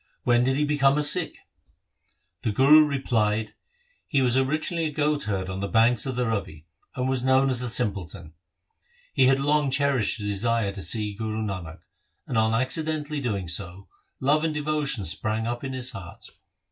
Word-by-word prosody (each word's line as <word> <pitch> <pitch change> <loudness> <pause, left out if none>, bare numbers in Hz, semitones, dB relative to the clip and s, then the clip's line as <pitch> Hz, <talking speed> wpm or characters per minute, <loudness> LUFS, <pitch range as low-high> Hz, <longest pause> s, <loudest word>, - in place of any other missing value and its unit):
When 120 0 +3
did 130 +1 +1
he 150 - +1
become 145 -1 +2
a 150 - +2
Sikh? 165 +3 +1 0.5
' 90 0 -33
The 110 - -1
Guru 150 +7 +6
replied, 110 -6 -1 0.3
' - - -39
He 140 -5 +1
was 125 -1 +2
originally 155 +5 0
a 155 - -2
goat 150 0 0
herd 95 -3 -2
on 95 0 -5
the 100 - -2
banks 115 +3 +2
of 130 - -3
the 125 0 0
Ravi, 95 -9 -4 0.3
and 130 -1 -1
was 130 -1 0
known 130 +1 +3
as 125 - -1
"The 125 -1 -3
simpleton". 100 -8 -2 0.8
He 130 - +4
had 135 +1 +3
long 145 0 +1
cherished 135 -5 +1
a - - -5
desire 105 +1 0
to 100 0 -7
see 105 +4 0
Guru 110 +1 -4
Nanak, 95 -6 -6 0.4
and, 125 - -5
on 110 0 +2
accidentally 150 +4 -1
doing 100 -8 -3
so, 90 +1 -3 0.3
love 145 +4 +2
and 160 -2 -1
devotion 150 -6 -1
sprang 110 +5 0
up 120 +2 -4
in 135 -1 -4
his 130 0 -1
heart. 90 -2 -10
125 Hz, 185 wpm, -25 LUFS, 105-140 Hz, 0.8 s, Guru